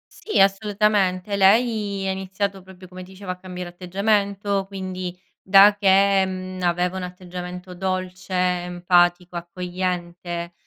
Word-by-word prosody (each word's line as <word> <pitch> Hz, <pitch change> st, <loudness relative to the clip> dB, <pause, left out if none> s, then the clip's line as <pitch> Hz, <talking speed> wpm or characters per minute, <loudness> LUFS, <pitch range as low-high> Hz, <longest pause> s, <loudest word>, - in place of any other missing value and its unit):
Sì 430 Hz, -, -2 dB
assolutamente. 200 Hz, -1 st, +2 dB
Lei 200 Hz, -1 st, +2 dB
ha -, -, +1 dB
iniziato 190 Hz, +1 st, -3 dB
proprio 185 Hz, 0 st, -14 dB
come 185 Hz, 0 st, -10 dB
ti 185 Hz, -, -14 dB
dicevo, 190 Hz, -1 st, -6 dB
a -, -, -4 dB
cambiare 180 Hz, -1 st, -7 dB
atteggiamento 200 Hz, +2 st, 0 dB
quindi 185 Hz, -2 st, -6 dB, 0.2 s
da 200 Hz, +2 st, +7 dB
che, 195 Hz, -1 st, +4 dB
mhmm, 185 Hz, 0 st, -5 dB
aveva 180 Hz, +1 st, 0 dB
un 185 Hz, -, -4 dB
atteggiamento 180 Hz, 0 st, -8 dB
dolce, 185 Hz, 0 st, -4 dB
empatico, 180 Hz, 0 st, +1 dB
accogliente, 175 Hz, -1 st, -4 dB
185 Hz, 125 wpm, -23 LUFS, 180-195 Hz, 0.2 s, da